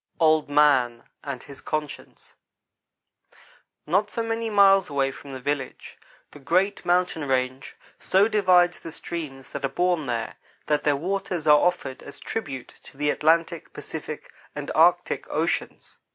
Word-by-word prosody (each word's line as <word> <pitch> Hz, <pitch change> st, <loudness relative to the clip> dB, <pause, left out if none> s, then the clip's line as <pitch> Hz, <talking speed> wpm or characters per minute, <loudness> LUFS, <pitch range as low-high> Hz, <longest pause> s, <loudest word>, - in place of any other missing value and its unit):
OLD 155 Hz, -2 st, +3 dB
MAN 135 Hz, -5 st, +3 dB, 0.2 s
AND 140 Hz, -3 st, -6 dB
HIS 140 Hz, -1 st, -13 dB
CONSCIENCE 155 Hz, -2 st, -6 dB, 1.5 s
NOT 195 Hz, +6 st, +1 dB
so 230 Hz, -, -3 dB
many 225 Hz, 0 st, -2 dB
miles 195 Hz, -3 st, +5 dB
away 135 Hz, -1 st, 0 dB
from 140 Hz, +1 st, -11 dB
the 130 Hz, -, -6 dB
village, 140 Hz, 0 st, -4 dB, 0.4 s
the 145 Hz, -, -13 dB
great 185 Hz, +8 st, +1 dB
mountain 175 Hz, -4 st, +1 dB
range 130 Hz, 0 st, -1 dB, 0.2 s
so 195 Hz, +3 st, +3 dB
divides 185 Hz, -5 st, +3 dB
the 165 Hz, -, -9 dB
streams 150 Hz, -5 st, -7 dB
that 140 Hz, -, -6 dB
are 135 Hz, -, +1 dB
born 175 Hz, +1 st, 0 dB
there, 115 Hz, -2 st, -3 dB, 0.3 s
that 150 Hz, -1 st, +1 dB
their 145 Hz, -1 st, +2 dB
waters 180 Hz, +1 st, -3 dB
are 150 Hz, -1 st, +7 dB
offered 175 Hz, -7 st, -1 dB
as -, -, -12 dB
tribute 140 Hz, -, -5 dB
to -, -, -17 dB
the 145 Hz, 0 st, +1 dB
Atlantic, 165 Hz, +1 st, +1 dB
Pacific, -, -, -7 dB, 0.2 s
and -, -, -5 dB
Arctic -, -, +3 dB
Oceans. -, -, -3 dB
155 Hz, 145 wpm, -25 LUFS, 140-180 Hz, 1.5 s, are